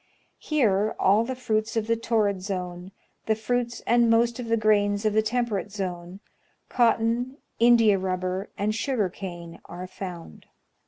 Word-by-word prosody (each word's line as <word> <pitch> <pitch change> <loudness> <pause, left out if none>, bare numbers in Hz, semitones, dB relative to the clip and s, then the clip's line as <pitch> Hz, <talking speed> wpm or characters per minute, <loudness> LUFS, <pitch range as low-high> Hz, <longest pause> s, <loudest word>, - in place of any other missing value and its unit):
Here 215 -8 +1
all 205 +4 +4
the 260 +2 -4
fruits 220 -3 -1
of 220 - 0
the 230 +1 +1
torrid 215 -4 0
zone, 180 -1 -5 0.4
the 220 - +3
fruits 235 +2 -2
and 235 -1 +4
most 230 +1 +2
of 245 - -5
the 230 0 +2
grains 205 -1 +2
of 215 - +2
the 220 - +4
temperate 220 -3 -2
zone, 185 -1 -5 0.5
cotton, 235 +2 +1 0.2
India 230 -4 +5
rubber, 185 +1 -2
and 210 +2 0
sugar 225 -4 0
cane, 170 -2 -8
are 180 +1 -7
found. 180 - -9
215 Hz, 150 wpm, -25 LUFS, 190-230 Hz, 0.5 s, India